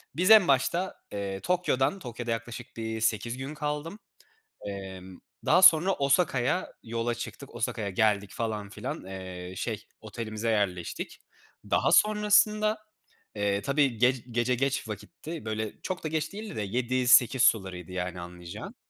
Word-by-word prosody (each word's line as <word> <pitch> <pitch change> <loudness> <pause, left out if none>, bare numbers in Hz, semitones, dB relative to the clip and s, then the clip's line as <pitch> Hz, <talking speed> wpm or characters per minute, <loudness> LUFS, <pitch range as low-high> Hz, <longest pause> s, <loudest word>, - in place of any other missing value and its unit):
biz 180 +7 +3
en 215 -4 +9
başta, 155 +7 +1 0.2
eee, 100 -1 -4
Tokyo’dan 180 - +1
Tokyo’da 120 -5 -5
yaklaşık 115 +1 -6
bir 110 0 -4
8 110 +2 0
gün 135 +3 -5
kaldım. 150 +5 -4 0.7
Emm, 95 -2 -8 0.3
daha - - +5
sonra 180 +1 +7
Osaka’ya 140 +1 +1
yola 115 +1 -2
çıktık. 125 +3 -8
Osaka’ya 110 -2 -2
geldik 105 0 +1
falan 110 -3 -3
filan, - - -6
eee, 95 -1 -7
şey - - -3 0.2
otelimize 110 0 -4
yerleştik. 95 -5 -2 0.5
Daha - - +3
sonrasında, 210 0 +4 0.6
eee, 100 -1 0
tabii 140 0 +1
gec 125 +2 +3
gece 120 +2 +1
geç 135 -1 -1
vakitti, 155 - -7
böyle, 110 0 -4
çok 185 -1 -4
da - - -1
geç 155 +1 -2
değildi 210 0 -7
de - - -2
7-8 125 +3 +3
sularıydı, 95 -5 +1
yani, 90 0 -4
anlayacağın. 85 0 -9
120 Hz, 135 wpm, -28 LUFS, 100-150 Hz, 0.7 s, en